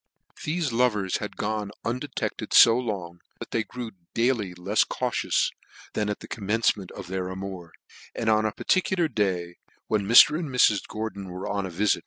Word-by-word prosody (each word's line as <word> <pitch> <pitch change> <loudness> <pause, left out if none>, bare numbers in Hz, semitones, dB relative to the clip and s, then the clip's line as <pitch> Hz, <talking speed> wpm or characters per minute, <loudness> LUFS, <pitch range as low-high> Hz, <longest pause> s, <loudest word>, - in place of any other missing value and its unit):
Thefe 155 -2 -2
love's 110 -6 +1
had 105 - -7
gone 105 -1 -2 0.2
on 115 - +1
undetected 130 +1 -4
fo 115 - +9
long, 100 -8 -4 0.2
that - - -9
they 115 - 0
grew 120 0 -7 0.2
daily 115 -6 +1
lefs 95 +5 +2
cautious - - 0 0.4
than 105 -1 -1
at 105 - -4
the - - -9
commencement 105 -2 0
of 100 - -8
their 95 0 -3
amour; 95 -2 -7 0.4
and 115 - -3
on 110 0 +4
a 110 - 0
parti 185 - +1
cular 175 -7 -1
day, 90 -5 -1 0.3
when 105 -3 0
Mr. 150 +7 +8
and 165 -4 -4
Mrs. 120 -5 +3
Gordon 105 -3 -5
were 90 +1 -6
on 100 -1 -2
a - - -6
vifit, 100 +4 +1
REV. - - -9
105 Hz, 185 wpm, -26 LUFS, 95-115 Hz, 0.4 s, fo